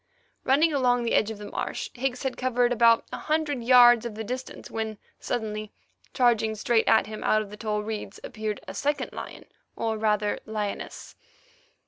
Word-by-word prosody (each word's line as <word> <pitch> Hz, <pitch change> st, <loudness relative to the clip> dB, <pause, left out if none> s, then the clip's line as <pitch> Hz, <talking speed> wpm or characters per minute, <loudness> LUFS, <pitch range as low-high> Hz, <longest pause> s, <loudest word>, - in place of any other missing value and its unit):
Running 300 Hz, +5 st, +3 dB
along 245 Hz, -3 st, +2 dB
the 235 Hz, -, -1 dB
edge 215 Hz, -, +3 dB
of 220 Hz, -, -6 dB
the 205 Hz, -, -9 dB
marsh, 475 Hz, -, -4 dB
Higgs 255 Hz, 0 st, -3 dB
had 265 Hz, -1 st, -2 dB
covered 245 Hz, -1 st, +1 dB
about 230 Hz, -1 st, +4 dB
a -, -, -4 dB
hundred 305 Hz, -5 st, -1 dB
yards 240 Hz, -1 st, +7 dB
of 235 Hz, -3 st, -5 dB
the 220 Hz, -, -4 dB
distance, 255 Hz, +4 st, -6 dB
when 220 Hz, -1 st, -3 dB, 0.2 s
suddenly, 215 Hz, -2 st, -4 dB, 0.4 s
charging 230 Hz, -4 st, +2 dB
straight 225 Hz, +1 st, +1 dB
at 220 Hz, -, +5 dB
him 215 Hz, 0 st, -7 dB
out 215 Hz, 0 st, +3 dB
of 205 Hz, -, -13 dB
the -, -, -7 dB
tall 210 Hz, -1 st, -2 dB
reeds, 210 Hz, -2 st, -6 dB
appeared 215 Hz, -2 st, -4 dB
a -, -, -6 dB
second 290 Hz, +1 st, -2 dB
lion, -, -, -8 dB, 0.3 s
or 220 Hz, -1 st, -2 dB
rather 210 Hz, -1 st, +1 dB
lioness. 210 Hz, -2 st, -5 dB
230 Hz, 175 wpm, -26 LUFS, 215-250 Hz, 0.4 s, yards